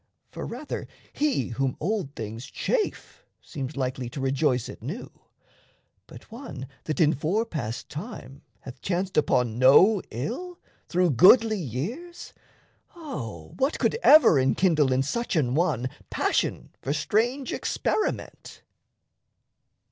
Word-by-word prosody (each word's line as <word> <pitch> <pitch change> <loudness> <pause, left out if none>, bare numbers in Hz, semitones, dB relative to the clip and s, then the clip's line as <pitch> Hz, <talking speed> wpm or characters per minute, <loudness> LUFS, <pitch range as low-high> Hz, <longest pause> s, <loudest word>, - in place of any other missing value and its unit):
For - - -6
rather - - -6 0.3
he 285 - 0
Whom 130 +2 -2
old 180 -5 -2
things 110 +3 -6
chafe 440 -4 -2 0.2
seems 140 -2 -7
likely 130 -2 -2
to 130 - -7
rejoice 135 -2 +1
At - - -10
new; 155 - -6 1.0
but - - -14
one 225 - -7 0.2
that 155 - -3
in 160 -2 +5
fore 175 - 0
passed 120 - -5
time 150 - -8 0.2
Hath 130 -1 -11
chanced 185 +1 -2
upon 125 -6 +2
no 180 +11 +6
ill, 255 - -5 0.3
through 180 -2 +2
goodly 215 - +6
years, 215 - -6 0.6
O 115 - -7
what 270 +4 +1
could - - +1
ever 300 - +7
enkindle 150 +1 +3
in 130 +1 +2
such 235 - -2
an 130 -6 +1
one 145 -6 +1 0.2
Passion - - -1
for 140 - -1
strange 235 - 0
experiment? 430 - -3
150 Hz, 125 wpm, -26 LUFS, -, 1.0 s, ever